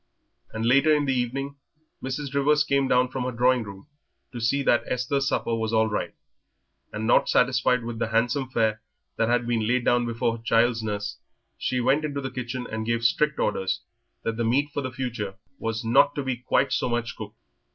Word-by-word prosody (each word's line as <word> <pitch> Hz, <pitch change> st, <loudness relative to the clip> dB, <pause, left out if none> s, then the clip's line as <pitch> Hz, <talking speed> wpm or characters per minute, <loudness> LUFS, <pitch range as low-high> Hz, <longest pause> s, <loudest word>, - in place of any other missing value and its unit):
And 110 Hz, +1 st, -3 dB
later 140 Hz, +6 st, +4 dB
in 150 Hz, -1 st, +3 dB
the 135 Hz, -, +1 dB
evening 135 Hz, +3 st, -2 dB, 0.4 s
Mrs. 135 Hz, +1 st, -4 dB
Rivers 145 Hz, +2 st, +3 dB
came 140 Hz, -2 st, +1 dB
down 125 Hz, 0 st, +3 dB
from 130 Hz, 0 st, -3 dB
her 130 Hz, -, -1 dB
drawing 125 Hz, +1 st, +2 dB
room 100 Hz, +1 st, -10 dB, 0.5 s
to 120 Hz, -2 st, -6 dB
see 140 Hz, +5 st, +1 dB
that 120 Hz, -, +3 dB
Esther's 135 Hz, +2 st, 0 dB
supper 115 Hz, -, -1 dB
was 110 Hz, 0 st, -1 dB
all 110 Hz, 0 st, +4 dB
right, 105 Hz, -, -3 dB, 0.8 s
and 110 Hz, +1 st, -4 dB
not 115 Hz, -, +4 dB
satisfied 125 Hz, -1 st, +2 dB
with 115 Hz, -1 st, -5 dB
the 115 Hz, -, 0 dB
handsome 120 Hz, +4 st, 0 dB
fare 110 Hz, -3 st, 0 dB, 0.4 s
that 115 Hz, -, +1 dB
had 120 Hz, 0 st, +2 dB
been 115 Hz, -2 st, 0 dB
laid 125 Hz, +1 st, +1 dB, 0.2 s
before 115 Hz, 0 st, -1 dB
her 115 Hz, -, -16 dB
child's 115 Hz, 0 st, +2 dB
nurse, 105 Hz, -1 st, -4 dB, 0.4 s
she 125 Hz, -, -1 dB
went 135 Hz, +5 st, +2 dB
into 145 Hz, -2 st, -2 dB
the 135 Hz, -2 st, -4 dB
kitchen 125 Hz, 0 st, -4 dB
and 110 Hz, 0 st, -5 dB
gave 115 Hz, 0 st, 0 dB
strict 150 Hz, +5 st, +2 dB
orders 95 Hz, -2 st, -1 dB, 0.4 s
that 115 Hz, 0 st, -2 dB
the 120 Hz, -, 0 dB
meat 140 Hz, +6 st, +1 dB
for 145 Hz, -, -1 dB
the 130 Hz, -1 st, -4 dB
future 120 Hz, -6 st, -4 dB, 0.2 s
was 115 Hz, +1 st, -3 dB
not 140 Hz, +5 st, +4 dB
to 145 Hz, -, -2 dB
be 130 Hz, -1 st, -1 dB
quite 130 Hz, +2 st, 0 dB
so -, -, 0 dB
much 120 Hz, 0 st, -2 dB
cooked. -, -, -9 dB
125 Hz, 200 wpm, -25 LUFS, 115-135 Hz, 0.8 s, later